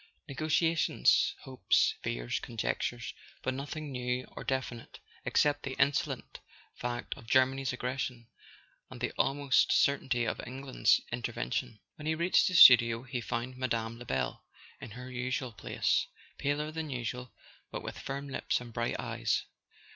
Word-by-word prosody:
Negotiations, 155 Hz, +3 st, +2 dB
hopes, 130 Hz, -1 st, +2 dB
fears, -, -, -2 dB
conjectures—but 120 Hz, +2 st, -4 dB
nothing 145 Hz, +2 st, -5 dB
new 125 Hz, 0 st, -2 dB
or -, -, -6 dB
definite, 130 Hz, -3 st, -4 dB, 0.3 s
except 145 Hz, -1 st, +2 dB
the 135 Hz, -1 st, -5 dB
insolent 140 Hz, 0 st, 0 dB, 0.3 s
fact 120 Hz, 0 st, -4 dB
of 120 Hz, -5 st, -14 dB
Germany's 130 Hz, +1 st, +3 dB
aggression, 125 Hz, -1 st, -3 dB, 0.6 s
and -, -, -10 dB
the -, -, -1 dB
almost 140 Hz, -1 st, +3 dB
certainty 130 Hz, -4 st, +2 dB
of -, -, -2 dB
England's 130 Hz, +1 st, +2 dB
in¬ 120 Hz, -, -2 dB
tervention. 115 Hz, 0 st, -3 dB, 0.2 s
When 150 Hz, -, -7 dB
he 160 Hz, -, +2 dB
reached 170 Hz, +3 st, +3 dB
the 185 Hz, -, -1 dB
studio 120 Hz, -6 st, +9 dB
he 125 Hz, -1 st, -4 dB
found 120 Hz, +2 st, -4 dB
Mme. 115 Hz, -2 st, -2 dB
Lebel 120 Hz, -, -2 dB, 0.4 s
in -, -, -8 dB
her 125 Hz, +4 st, -9 dB
usual 125 Hz, 0 st, -2 dB
place, -, -, 0 dB, 0.3 s
paler 150 Hz, +2 st, -1 dB
than 160 Hz, -1 st, -4 dB
usual, 125 Hz, -1 st, -4 dB, 0.4 s
but -, -, -6 dB
with -, -, -6 dB
firm 140 Hz, +1 st, -5 dB
lips 135 Hz, -, -1 dB
and 120 Hz, -1 st, -10 dB
bright 120 Hz, +1 st, -1 dB
eyes. -, -, -1 dB
130 Hz, 140 wpm, -31 LUFS, 120-140 Hz, 0.6 s, studio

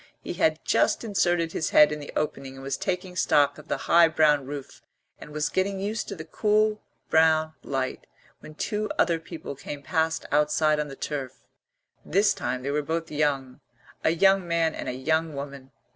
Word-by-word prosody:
He -, -, -6 dB
had -, -, +1 dB
just -, -, +2 dB
inserted 175 Hz, -6 st, +1 dB
his 160 Hz, -, -2 dB
head 150 Hz, 0 st, +6 dB
in 150 Hz, -, -3 dB
the 145 Hz, -, -8 dB
opening 135 Hz, -3 st, -3 dB
and 135 Hz, -, -10 dB
was 135 Hz, 0 st, -2 dB
taking 180 Hz, +2 st, -3 dB
stock 145 Hz, -4 st, +3 dB
of 150 Hz, -, -14 dB
the -, -, -1 dB
high 170 Hz, 0 st, +6 dB
brown 150 Hz, -4 st, +3 dB
roof 140 Hz, -1 st, -8 dB, 0.4 s
and -, -, -11 dB
was 150 Hz, 0 st, -1 dB
getting 195 Hz, +1 st, -1 dB
used 210 Hz, +3 st, -3 dB
to 200 Hz, -, -5 dB
the 160 Hz, -3 st, -8 dB
cool 215 Hz, +4 st, +1 dB, 0.3 s
brown 160 Hz, 0 st, +4 dB
light 135 Hz, -1 st, -3 dB, 0.3 s
when 155 Hz, -, -12 dB
two 210 Hz, +5 st, -2 dB
other 170 Hz, -1 st, +2 dB
people 165 Hz, -2 st, -8 dB
came 145 Hz, +1 st, -8 dB
past 160 Hz, +3 st, 0 dB
outside 150 Hz, +1 st, +2 dB
on 150 Hz, -, -1 dB
the 135 Hz, -, -9 dB
turf. 135 Hz, -4 st, -5 dB, 0.6 s
This 205 Hz, +2 st, +3 dB
time 125 Hz, +1 st, -3 dB
they 140 Hz, -, -2 dB
were 150 Hz, +1 st, +1 dB
both 160 Hz, +2 st, -3 dB
young, 140 Hz, -4 st, -1 dB, 0.4 s
a -, -, +4 dB
young 190 Hz, +2 st, +3 dB
man 165 Hz, -1 st, +1 dB
and -, -, -5 dB
a -, -, -3 dB
young 160 Hz, +4 st, 0 dB
woman. 140 Hz, -1 st, -7 dB
155 Hz, 190 wpm, -26 LUFS, 145-170 Hz, 0.6 s, head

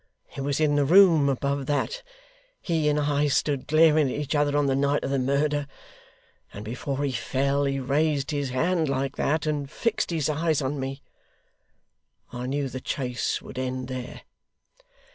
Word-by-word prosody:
It -, -, -4 dB
was 140 Hz, +1 st, -1 dB
in 150 Hz, -2 st, +2 dB
the 145 Hz, -, +3 dB
room 165 Hz, -2 st, +6 dB
above 140 Hz, 0 st, -1 dB
that 470 Hz, -, -1 dB, 0.6 s
HE 160 Hz, -3 st, +1 dB
and 150 Hz, 0 st, +1 dB
I 145 Hz, 0 st, +1 dB
stood 140 Hz, -1 st, 0 dB
glaring 155 Hz, -2 st, +4 dB
at 135 Hz, -, -3 dB
each 145 Hz, 0 st, -3 dB
other 145 Hz, -1 st, +2 dB
on 145 Hz, -, +2 dB
the 135 Hz, -1 st, +1 dB
night 140 Hz, +1 st, +1 dB
of 135 Hz, -, -2 dB
the 140 Hz, -, +1 dB
murder, 140 Hz, +2 st, 0 dB, 0.8 s
and 105 Hz, -, -9 dB
before 135 Hz, +5 st, -3 dB
he 140 Hz, -, 0 dB
fell 140 Hz, +3 st, 0 dB
he 135 Hz, 0 st, -1 dB
raised 140 Hz, +2 st, 0 dB
his 145 Hz, -2 st, -2 dB
hand 160 Hz, +4 st, 0 dB
like 135 Hz, 0 st, -1 dB
that, 155 Hz, +2 st, 0 dB
and 145 Hz, -2 st, -2 dB
fixed 230 Hz, +8 st, -1 dB
his 160 Hz, -4 st, 0 dB
eyes 155 Hz, 0 st, +1 dB
on 140 Hz, 0 st, -2 dB
me. 135 Hz, +1 st, -5 dB, 1.3 s
I 125 Hz, +1 st, -4 dB
knew 140 Hz, +1 st, -1 dB
the 130 Hz, 0 st, -6 dB
chase 125 Hz, -3 st, -2 dB
would 130 Hz, -, -8 dB
end 130 Hz, 0 st, -3 dB
there. 130 Hz, -1 st, -6 dB
140 Hz, 175 wpm, -26 LUFS, 135-150 Hz, 1.3 s, room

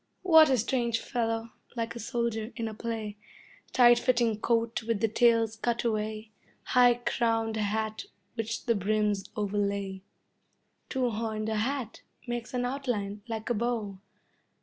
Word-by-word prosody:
What 320 Hz, -4 st, +7 dB
a 260 Hz, -, +4 dB
strange 235 Hz, 0 st, 0 dB
fellow, 225 Hz, -1 st, -2 dB, 0.2 s
like 230 Hz, -1 st, -3 dB
a -, -, -6 dB
soldier 230 Hz, -1 st, -2 dB
in 230 Hz, -2 st, -3 dB
a 220 Hz, -, -5 dB
play, 220 Hz, -2 st, -4 dB, 0.5 s
Tight 240 Hz, -1 st, +6 dB
fitting 240 Hz, -4 st, +2 dB
coat 230 Hz, 0 st, +1 dB
with 225 Hz, -2 st, -1 dB
the 225 Hz, -, +2 dB
tails 230 Hz, 0 st, +3 dB
cut 235 Hz, +1 st, -1 dB
away, 215 Hz, -1 st, -2 dB, 0.3 s
High 245 Hz, -1 st, +5 dB
crowned 225 Hz, -2 st, 0 dB
hat 220 Hz, +1 st, -2 dB, 0.3 s
which 230 Hz, 0 st, -4 dB
the 235 Hz, -, +3 dB
brims 210 Hz, -1 st, 0 dB
overlay. 200 Hz, -2 st, -1 dB, 0.9 s
Two 255 Hz, -3 st, 0 dB
horned 220 Hz, 0 st, -2 dB
hat 225 Hz, +2 st, -2 dB, 0.2 s
makes 240 Hz, -1 st, -4 dB
an 245 Hz, 0 st, 0 dB
outline 240 Hz, -6 st, -2 dB
like 225 Hz, 0 st, -3 dB
a -, -, +4 dB
bow. 220 Hz, -4 st, -2 dB
225 Hz, 140 wpm, -29 LUFS, 215-240 Hz, 0.9 s, What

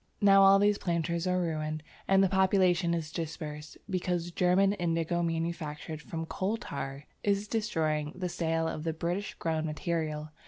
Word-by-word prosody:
Now 195 Hz, -1 st, +6 dB
all 195 Hz, 0 st, +8 dB
these 205 Hz, +1 st, +3 dB
planters 170 Hz, 0 st, -1 dB
are 180 Hz, 0 st, +2 dB
ruined 155 Hz, -2 st, -2 dB, 0.2 s
and 195 Hz, 0 st, +5 dB
the -, -, +5 dB
population 185 Hz, -2 st, +3 dB
is 160 Hz, -2 st, -4 dB
dispersed, 155 Hz, -3 st, -6 dB
because 180 Hz, -3 st, -1 dB
German 185 Hz, +3 st, +3 dB
indigo 170 Hz, -2 st, 0 dB
manufactured 165 Hz, -2 st, -3 dB
from 165 Hz, +1 st, -5 dB
coal 195 Hz, +6 st, -2 dB
tar 140 Hz, -, -6 dB, 0.2 s
is 200 Hz, 0 st, +1 dB
destroying 155 Hz, -9 st, -1 dB
the 185 Hz, 0 st, -3 dB
sale 165 Hz, -1 st, 0 dB
of 155 Hz, -, -4 dB
the 160 Hz, -1 st, -1 dB
British 175 Hz, +5 st, -3 dB
grown 160 Hz, -1 st, -1 dB
material. 155 Hz, -1 st, -2 dB
170 Hz, 155 wpm, -30 LUFS, 155-190 Hz, 0.2 s, all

